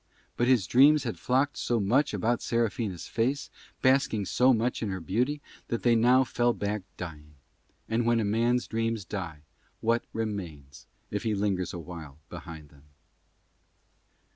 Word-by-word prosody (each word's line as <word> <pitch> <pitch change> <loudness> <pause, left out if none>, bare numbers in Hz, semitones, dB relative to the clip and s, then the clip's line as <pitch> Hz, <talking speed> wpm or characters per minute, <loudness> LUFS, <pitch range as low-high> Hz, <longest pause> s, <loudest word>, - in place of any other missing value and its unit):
But 120 - +1
his 125 -7 +4
dreams 140 - +5
had 120 -4 -4
flocked 135 +3 +1
so 120 -1 0
much 120 +9 +2
about 120 +1 0
Serafina's 110 -5 -1
face, 130 +5 -1 0.3
basking 130 -5 +3
so 125 +7 +4
much 120 +1 0
in 110 - -1
her 95 -1 -3
beauty, 125 - -1 0.3
that 115 - -3
they 120 - +5
now 125 +3 +5
fell 120 -1 +1
back 105 0 -2 0.2
dying; 75 -4 -8 0.5
and 115 +2 0
when 115 0 +2
a 110 - 0
man's 120 +4 +1
dreams 115 -2 -2
die 85 -6 -5 0.4
what 115 +1 +1
remains, 85 -11 -5 0.2
if 105 - -2
he 110 -2 0
lingers 100 -3 -1
awhile 85 -5 -8
behind 80 -4 -9
them? 70 0 -21
115 Hz, 150 wpm, -28 LUFS, 90-120 Hz, 0.5 s, dreams